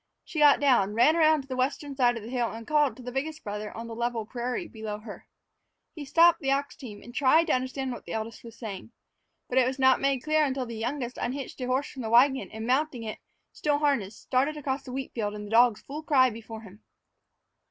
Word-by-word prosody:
She 320 - -5
got 295 -1 +6
down, 240 -8 +3
ran 250 +8 +5
around 310 -3 +4
to - - -19
the 260 - -4
western 275 +2 -2
side 245 -3 +3
of 225 - -8
the 225 - -8
hill, 240 -2 -1
and 225 +1 -8
called 295 -5 +2
to 255 - -11
the 250 - -6
biggest 305 +4 -4
brother 210 0 -5
on 230 - -6
the 230 - -7
level 235 -1 -2
prairie 250 +8 -4
below 220 -2 -6
her. 210 0 -11 0.7
He 300 -3 -8
stopped 335 +4 +5
the 270 - -1
ox 280 +1 -1
team 210 -7 -10
and 240 - -12
tried 295 +5 +4
to 320 - +1
understand 260 +1 -2
what 240 - -8
the - - -6
eldest 225 +1 -5
was 230 -1 -12
saying. 225 0 -8 0.5
But 255 - +2
it 250 - +3
was 260 +1 -2
not 260 -1 +4
made 275 -2 +1
clear 310 0 +2
until 265 -2 -1
the 235 - -7
youngest 245 +2 -4
unhitched 265 +1 -4
a 250 - -2
horse 260 +3 -1
from 265 - -8
the 220 - -4
wagon 265 +4 +4
and 220 0 -7
mounting 260 -1 0
it, 215 -1 -6 0.3
still 295 -1 0
harnessed, 270 -9 -1
started 275 +4 0
across 275 -2 -2
the 260 - -10
wheat 265 +1 -5
field 210 -3 -2
with 210 0 -7
the 205 - -9
dogs 230 -2 +4
in - - -35
full 295 +3 -6
cry 265 -5 +4
before 225 0 -9
him. 205 -1 -14
255 Hz, 240 wpm, -27 LUFS, 230-280 Hz, 0.7 s, got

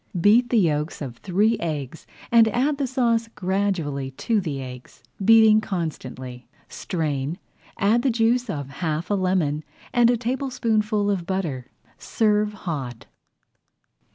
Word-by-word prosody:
Beat 225 +7 +4
the 235 - +2
yolks 155 -5 +1
of 125 -5 -6
three 210 +5 +1
eggs 150 -3 -5 0.2
and 230 -1 +6
add 275 +6 0
the 275 - 0
sauce 235 -3 +1
gradually 180 -8 -1
to 210 - -1
the 150 -6 -4
eggs, 125 -1 -10 0.2
beating 220 0 +6
constantly. 130 -10 -5 0.2
Strain, 150 -2 -3 0.4
add 220 +4 +3
the 270 - +1
juice 235 +1 +1
of 145 -7 -4
half 160 +2 -2
a - - +3
lemon 180 -6 0 0.3
and 240 -1 +5
a 245 - +3
tablespoonful 225 -4 0
of 180 -4 -3
butter. 160 -10 -3 0.3
Serve 210 -1 +1
hot. 130 -9 -4
195 Hz, 130 wpm, -23 LUFS, 150-225 Hz, 0.4 s, and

